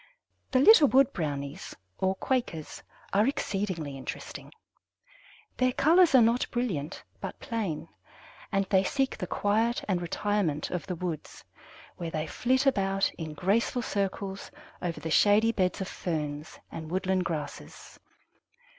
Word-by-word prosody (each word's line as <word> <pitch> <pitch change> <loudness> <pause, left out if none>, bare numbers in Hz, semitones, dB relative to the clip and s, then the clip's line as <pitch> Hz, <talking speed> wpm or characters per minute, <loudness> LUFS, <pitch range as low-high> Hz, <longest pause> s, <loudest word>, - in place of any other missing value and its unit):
The 260 - +2
"little 315 0 +8
wood 270 +1 +4
brownies," 145 0 -4 0.2
or 190 0 +1
Quakers, 190 - -2 0.3
are 205 +4 +4
exceedingly 190 - -2
interesting. 135 - -7 1.1
Their 255 0 +2
colors 330 +1 +5
are 250 - +8
not 235 +2 +2
brilliant, 190 - -3 0.2
but - - -6
plain, 215 - -3 0.6
and 195 -1 +1
they 190 -1 +5
seek 270 +6 0
the 180 - -5
quiet 220 +6 +1
and 185 -3 0
retirement 175 -3 -1
of 180 +1 -3
the 180 - -2
woods, 170 -3 -5 0.5
where 170 -2 -4
they 155 -1 -2
flit 260 +8 +1
about 195 -6 +2
in 155 -2 -5
graceful 230 - +1
circles 195 -1 -3 0.3
over 175 -2 -3
the 160 - -5
shady 210 +6 +5
beds 185 -3 0
of 190 - -3
ferns 150 -5 -4
and 160 -1 -7
woodland 185 +1 0
grasses. 150 - -6
195 Hz, 135 wpm, -28 LUFS, 165-230 Hz, 1.1 s, little